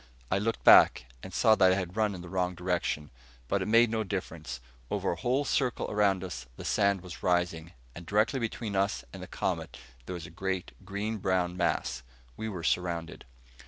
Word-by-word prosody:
I 95 - +3
looked 115 +3 -2
back, 60 - +7 0.2
and 95 - -9
saw 110 +4 +4
that 95 -3 +5
I - - +3
had 90 -1 -4
run 105 -2 +1
in 90 - -8
the 90 - -9
wrong 90 0 -1
direction. 85 -4 -2 0.4
But 100 - 0
it 95 - -2
made 115 +1 +5
no 110 -1 0
difference. 85 - -5 0.3
Over - - 0
a - - -2
whole 125 - 0
circle 130 -3 0
around 100 -3 +2
us 70 -9 -6
the - - -8
sand 100 -3 +2
was 90 -2 -9
rising, 90 -2 0 0.2
and 85 - -9
directly 105 +9 +1
between 115 -2 -3
us 100 +2 0
and - - -8
the - - -7
Comet - - -3 0.3
there 90 - -4
was 85 -2 -7
a 80 - -11
great 95 +1 -3
green 100 +3 -3
brown 90 -2 0
mass. 85 -7 -1 0.3
We 110 - -4
were 90 -5 -6
surrounded. 85 -1 -1
95 Hz, 195 wpm, -29 LUFS, 85-105 Hz, 0.4 s, back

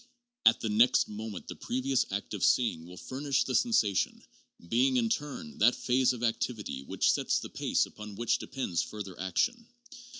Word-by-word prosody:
At 115 - +5
the 110 - -1
next 115 +4 +4
moment 105 -2 -7
the - - -6
previous 130 +1 -1
act 100 +2 -4
of 105 - -3
seeing 110 -10 +2
will 90 +1 -11
furnish 135 +4 -1
the 130 - -4
sensation, 120 - +1 0.4
being, 130 +6 +2
in 115 -2 +2
turn, 150 - -4
that 120 +4 +5
phase 125 +1 +2
of 120 -2 -6
activity 115 - -2
which 70 - +1
sets - - +1
the - - -5
pace - - 0
upon 105 -1 -10
which 120 +2 0
depends 110 -11 -2
further 100 -4 -7
action. 230 - -1
115 Hz, 170 wpm, -30 LUFS, 105-130 Hz, 0.4 s, At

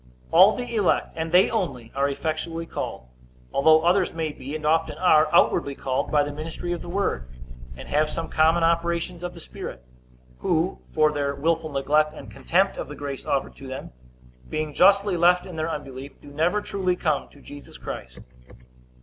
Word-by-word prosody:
All 190 +5 +7
the 245 -1 -5
elect, 210 -5 +1
and 160 0 -3
they 180 +2 +5
only, 120 -4 -3
are 140 +1 +1
effectually 160 +3 -3
called; 65 - -5 0.5
although 155 +3 +5
others 180 0 +2
may 160 -2 -2
be, 140 +1 -7
and 155 -1 -5
often 160 +1 +1
are, 155 -4 +4
outwardly 165 -4 +3
called 130 -1 -2
by 150 -1 +4
the 145 0 -5
ministry 165 +3 -5
of 175 - -3
the 175 - -8
word, 175 - -1 0.5
and - - -9
have 150 +1 +1
some 165 +1 -4
common 160 +2 +3
operations 170 +1 0
of 175 - -5
the - - -10
Spirit; 60 0 -8 0.6
who, 170 +1 0
for 155 -1 +3
their 140 -1 -1
willful 160 +2 0
neglect 150 +3 +2
and - - -11
contempt 190 +3 +1
of - - -4
the 145 - -8
grace 140 -2 -6
offered 135 - -1
to 135 - -10
them, 130 +1 -7 0.6
being 155 -1 -3
justly 195 +2 +4
left 180 +1 +4
in 180 - -9
their 160 +1 -2
unbelief, 140 -3 -7
do 145 - -14
never 165 +8 +1
truly 185 -3 -1
come 155 -5 -1
to 145 - -18
Jesus 145 0 -12
Christ. 65 +1 -8
160 Hz, 185 wpm, -24 LUFS, 145-175 Hz, 0.6 s, All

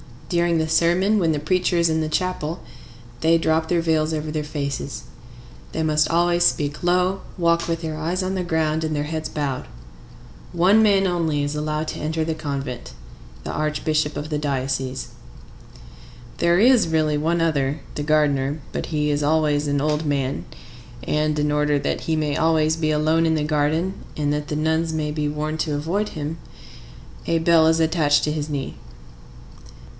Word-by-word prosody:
During 170 -1 +2
the 160 0 0
sermon, 175 +6 +3
when 165 -4 +2
the 150 - -1
preacher 180 +3 +1
is 170 -1 +3
in 160 0 +1
the 155 - -1
chapel, 170 0 -2 0.6
they 165 +3 +4
drop 160 0 +1
their 170 0 +1
veils 160 -1 +1
over 155 0 -3
their 150 -1 -3
faces. 140 -2 -4 0.7
They 160 - -1
must 155 -1 +2
always 175 +1 +2
speak 145 -3 0
low, 180 +2 +2 0.2
walk 170 -1 +2
with 165 -1 -2
their 160 -2 -4
eyes 170 +4 -1
on 185 +1 -2
the 185 -1 -1
ground 160 -2 0
and 155 -1 -2
their 145 - -1
heads 155 +1 -3
bowed. 145 -4 -3 0.9
One 185 +5 +5
man 200 -3 +4
only 165 -5 0
is 145 +1 -2
allowed 150 +1 -2
to - - -5
enter 160 +1 -1
the 160 0 -1
convent,—the 135 - -7
archbishop 155 0 -1
of 145 +1 -5
the 150 - -1
diocese. 135 -2 -2 1.3
There 170 +1 +3
is 240 -3 +5
really 155 -2 +1
one 165 +3 0
other,—the 145 -3 -1
gardener. 145 -1 +1
But - - -4
he 150 -2 0
is 145 0 0
always 150 -1 +1
an 145 -1 0
old 150 +1 0
man, 140 -2 -1 0.6
and, 150 +2 0
in 150 0 +1
order 150 0 +2
that - - -2
he 160 - -1
may 150 -2 -1
always 160 0 +2
be 155 -1 0
alone 155 +2 +2
in 160 0 +2
the 155 - 0
garden, 155 +5 0 0.2
and 145 -1 0
that 150 0 -2
the 150 - -3
nuns 160 +1 0
may 150 -1 -2
be 150 -1 -1
warned 155 +1 -3
to 155 -2 -1
avoid 175 +9 -1
him, 155 +1 -5 0.9
a 165 - +2
bell 160 -1 +4
is 160 0 +3
attached 155 -3 +3
to 150 - 0
his 150 0 -3
knee. 140 -2 -4
155 Hz, 175 wpm, -22 LUFS, 150-165 Hz, 1.3 s, One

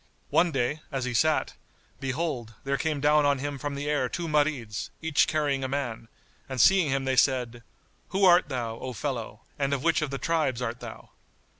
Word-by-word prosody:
One 175 -1 +4
day, 135 +2 -1
as 135 -3 -2
he 125 - -3
sat, 155 +7 +2 0.5
behold, 130 -5 -3
there 140 0 0
came 150 -1 -1
down 150 +1 +4
on 145 -1 +3
him 140 +1 -4
from 145 0 -4
the 145 +1 -4
air 145 -4 +1
two 170 +1 -3
Marids, 145 -8 0
each 160 -3 +2
carrying 145 -3 0
a - - 0
man; 120 -4 -3 0.4
and 130 -1 -4
seeing 185 - +5
him 135 0 0
they 130 0 +1
said, 125 -3 +2 0.5
"Who 195 +1 +2
art 175 -3 +6
thou, 115 -4 -3
O 130 -1 -5
fellow, 120 -4 -4 0.2
and 140 0 +1
of 135 - -5
which 165 -1 +3
of 150 - -1
the 135 - -3
tribes 155 -6 0
art 120 -1 -3
thou?" 115 -2 -10
140 Hz, 195 wpm, -27 LUFS, 125-150 Hz, 0.5 s, art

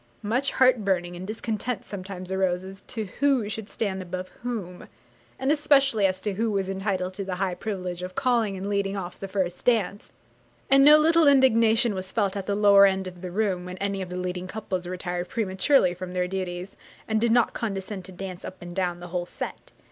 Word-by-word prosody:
Much 245 +7 0
heart 255 -4 +4
burning 175 -3 0
and 180 +2 -7
discontent 220 +1 -3
sometimes 185 -2 -7
arose 185 -1 0
as 195 +1 -10
to 225 -3 -4 0.2
who 275 -6 +3
should 215 0 -5
stand 195 -4 -2
above 185 0 -5
whom, 210 -8 -5 0.5
and 265 +2 +1
especially 275 -8 +4
as 185 0 -2
to 210 - -2
who 225 +4 0
was 195 -2 -1
entitled 190 -1 -2
to 195 - -4
the 190 -1 -3
high 185 0 -1
privilege 180 -3 -4
of 185 0 -6
calling 235 -7 +1
and 190 +1 -5
leading 200 -1 -1
off 180 -2 -6
the 195 - -5
first 185 -2 -2
dance: 215 -4 +1 0.6
and 275 0 +7
no 300 +2 +9
little 325 0 +4
indignation 235 -4 +5
was 185 -1 -5
felt 205 -3 0
at 195 -1 -4
the 200 - +1
lower 200 -1 +7
end 190 0 0
of 180 -1 -9
the 185 - -5
room 190 -1 0
when 180 0 -7
any 195 0 -2
of 185 - -5
the 180 - -5
leading 180 0 -3
couples 185 -3 -4
retired 180 0 -4
prematurely 190 0 +2
from 180 0 -7
their 180 0 0
duties, 185 0 -4 0.3
and 220 -1 +1
did 235 -1 +3
not 240 0 +3
condescend 195 -3 -4
to 190 - -11
dance 185 0 -7
up 185 - -8
and 175 0 -9
down 180 -2 -1
the 175 - -8
whole 175 0 -3
set. - - -7
195 Hz, 210 wpm, -26 LUFS, 185-220 Hz, 0.6 s, no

